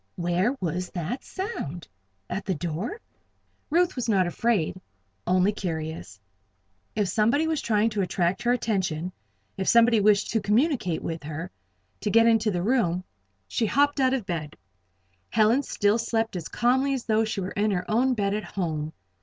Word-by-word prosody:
Where 175 Hz, +7 st, +1 dB
was 180 Hz, +1 st, -2 dB
that 180 Hz, -, -3 dB
sound? 180 Hz, -, -5 dB, 0.4 s
At 195 Hz, -, -4 dB
the 190 Hz, -, 0 dB
door? 175 Hz, -, -4 dB, 0.7 s
Ruth 345 Hz, +3 st, +2 dB
was 240 Hz, -3 st, -2 dB
not 190 Hz, -4 st, +3 dB
afraid 185 Hz, -2 st, 0 dB, 0.5 s
only 185 Hz, +2 st, +3 dB
curious. 160 Hz, -, -5 dB, 0.8 s
If 210 Hz, -2 st, +1 dB
somebody 230 Hz, -, +2 dB
was 320 Hz, -2 st, 0 dB
trying 220 Hz, 0 st, +2 dB
to 210 Hz, -1 st, -1 dB
attract 180 Hz, -1 st, 0 dB
her 240 Hz, -, +2 dB
attention 190 Hz, -8 st, -1 dB, 0.5 s
if 190 Hz, -, -2 dB
somebody 235 Hz, -1 st, +5 dB
wished 205 Hz, 0 st, +3 dB
to 225 Hz, -, +1 dB
communicate 220 Hz, -, +1 dB
with 165 Hz, 0 st, -4 dB
her, 155 Hz, +4 st, -6 dB, 0.5 s
to 210 Hz, -, -2 dB
get 230 Hz, +2 st, +5 dB
into 225 Hz, -1 st, +4 dB
the 175 Hz, -3 st, -1 dB
room 195 Hz, -6 st, +1 dB, 0.4 s
She 225 Hz, -, 0 dB
hopped 285 Hz, +4 st, +2 dB
out 260 Hz, 0 st, +3 dB
of 245 Hz, -7 st, -4 dB
bed. 155 Hz, -4 st, -4 dB, 0.7 s
Helen 225 Hz, +4 st, +3 dB
still 210 Hz, -4 st, +1 dB
slept 225 Hz, -2 st, -1 dB
as 170 Hz, -3 st, -4 dB
calmly 260 Hz, +4 st, +2 dB
as 255 Hz, -, -5 dB
though 220 Hz, 0 st, +2 dB
she 215 Hz, -2 st, -2 dB
was 185 Hz, 0 st, -4 dB
in 210 Hz, +1 st, +2 dB
her 180 Hz, -3 st, -1 dB
own 250 Hz, +4 st, +2 dB
bed 200 Hz, -2 st, 0 dB
at 210 Hz, 0 st, -2 dB
home. 160 Hz, -4 st, -3 dB
210 Hz, 165 wpm, -26 LUFS, 175-235 Hz, 0.8 s, somebody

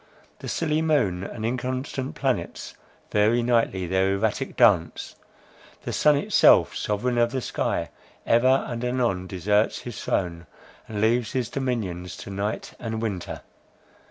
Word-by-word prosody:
The -, -, -8 dB
silly 155 Hz, -1 st, 0 dB
moon 105 Hz, -, +1 dB
and 110 Hz, +2 st, -5 dB
inconstant 130 Hz, +2 st, -3 dB
planets -, -, -2 dB, 0.4 s
vary 110 Hz, +3 st, +3 dB
nightly 115 Hz, -6 st, +1 dB
their 95 Hz, +2 st, +1 dB
erratic 110 Hz, +6 st, -1 dB
dance; 100 Hz, -9 st, +3 dB, 0.7 s
the -, -, -4 dB
sun 150 Hz, -1 st, +4 dB
itself, 140 Hz, -, +4 dB
sovereign 120 Hz, +4 st, -1 dB
of 120 Hz, 0 st, +3 dB
the 130 Hz, -, -1 dB
sky, -, -, -2 dB, 0.3 s
ever 130 Hz, +3 st, +4 dB
and 120 Hz, 0 st, -4 dB
anon 120 Hz, -7 st, 0 dB
deserts 105 Hz, +4 st, +1 dB
his 120 Hz, -4 st, -7 dB
throne, 85 Hz, -3 st, -2 dB, 0.4 s
and 105 Hz, -2 st, -4 dB
leaves 115 Hz, +1 st, +2 dB
his 125 Hz, -3 st, -1 dB
dominion 115 Hz, -10 st, -2 dB
to 95 Hz, +2 st, -8 dB
night 100 Hz, +2 st, -3 dB
and 110 Hz, -1 st, -4 dB
winter. 100 Hz, -6 st, -4 dB
115 Hz, 135 wpm, -25 LUFS, 95-125 Hz, 0.7 s, sun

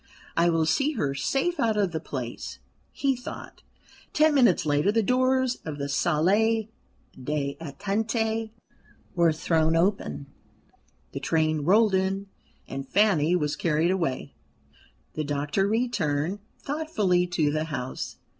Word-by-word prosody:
"I 170 Hz, +1 st, +3 dB
will 165 Hz, -1 st, +2 dB
see 275 Hz, -, +1 dB
her 145 Hz, -, -1 dB
safe 270 Hz, -, -1 dB
out 220 Hz, -2 st, +1 dB
of 200 Hz, -4 st, +1 dB
the 160 Hz, -, -2 dB
place," 125 Hz, -6 st, -6 dB, 0.3 s
he 275 Hz, -2 st, 0 dB
thought. 250 Hz, -, -9 dB, 0.5 s
Ten 310 Hz, 0 st, +4 dB
minutes 240 Hz, -, +4 dB
later 150 Hz, +6 st, +2 dB
the 225 Hz, +1 st, +2 dB
doors 255 Hz, +1 st, +2 dB
of 155 Hz, -2 st, -5 dB
the 140 Hz, -1 st, -3 dB
salle 185 Hz, +10 st, +2 dB, 0.6 s
d'attente 200 Hz, -, -2 dB, 0.6 s
were 170 Hz, -2 st, +4 dB
thrown 160 Hz, 0 st, +1 dB
open, 180 Hz, -4 st, 0 dB, 0.9 s
the -, -, -5 dB
train 155 Hz, -1 st, +1 dB
rolled 210 Hz, +3 st, +4 dB
in, 190 Hz, +1 st, 0 dB, 0.4 s
and 135 Hz, 0 st, -6 dB
Fanny 180 Hz, -6 st, +3 dB
was 150 Hz, -4 st, 0 dB
carried 165 Hz, +1 st, +1 dB
away. 170 Hz, -9 st, -2 dB, 0.8 s
The 155 Hz, -, -2 dB
doctor 145 Hz, +6 st, 0 dB
returned 200 Hz, -7 st, 0 dB, 0.2 s
thoughtfully 215 Hz, -, 0 dB
to 160 Hz, -4 st, +1 dB
the 155 Hz, +1 st, -1 dB
house. 130 Hz, -5 st, -5 dB
180 Hz, 125 wpm, -26 LUFS, 150-220 Hz, 0.9 s, Ten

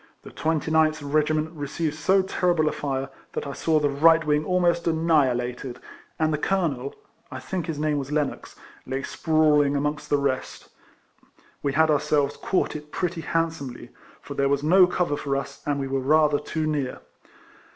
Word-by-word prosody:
The -, -, -11 dB
29th 155 Hz, -2 st, 0 dB
regiment 155 Hz, +1 st, +1 dB
received 155 Hz, 0 st, -3 dB
so 190 Hz, +5 st, +2 dB
terrible 175 Hz, -4 st, +1 dB
a -, -, +2 dB
fire, 135 Hz, -1 st, -3 dB, 0.2 s
that -, -, -3 dB
I 140 Hz, -, -5 dB
saw 160 Hz, +1 st, +1 dB
the 145 Hz, -1 st, +1 dB
right 160 Hz, +3 st, +4 dB
wing 150 Hz, 0 st, +2 dB
almost 175 Hz, 0 st, +1 dB
annihi 160 Hz, -5 st, +3 dB, 0.2 s
lated, 125 Hz, -1 st, -8 dB, 0.4 s
and 155 Hz, -1 st, +1 dB
the 150 Hz, -, -1 dB
colonel 150 Hz, -8 st, -1 dB, 0.3 s
(I 130 Hz, -, -7 dB
think 175 Hz, +4 st, -4 dB
his 160 Hz, -3 st, -3 dB
name 150 Hz, -1 st, 0 dB
was 140 Hz, +1 st, -6 dB
Lennox) 150 Hz, -2 st, -2 dB, 0.3 s
lay 135 Hz, +1 st, -3 dB
sprawling 150 Hz, -3 st, +2 dB
amongst 150 Hz, +1 st, -2 dB
the 145 Hz, -, +3 dB
rest. 140 Hz, -2 st, -3 dB, 0.9 s
We 140 Hz, -, -1 dB
had 160 Hz, +1 st, +4 dB
ourselves 145 Hz, -1 st, +1 dB
caught 185 Hz, -, -1 dB
it 150 Hz, 0 st, -8 dB
pretty 175 Hz, -3 st, -2 dB
hand 165 Hz, 0 st, 0 dB
somely; 125 Hz, -5 st, -9 dB, 0.3 s
for 140 Hz, -, -8 dB
there 140 Hz, 0 st, +1 dB
was 140 Hz, 0 st, 0 dB
no 180 Hz, +4 st, +6 dB
cover 180 Hz, -4 st, 0 dB
for 140 Hz, -1 st, -2 dB
us, 140 Hz, 0 st, -5 dB
and 145 Hz, -1 st, 0 dB
we 135 Hz, -, -2 dB
were 135 Hz, 0 st, -1 dB
rather 150 Hz, +2 st, +3 dB
too 155 Hz, +1 st, -3 dB
near. 145 Hz, -4 st, -2 dB
150 Hz, 175 wpm, -25 LUFS, 140-160 Hz, 0.9 s, no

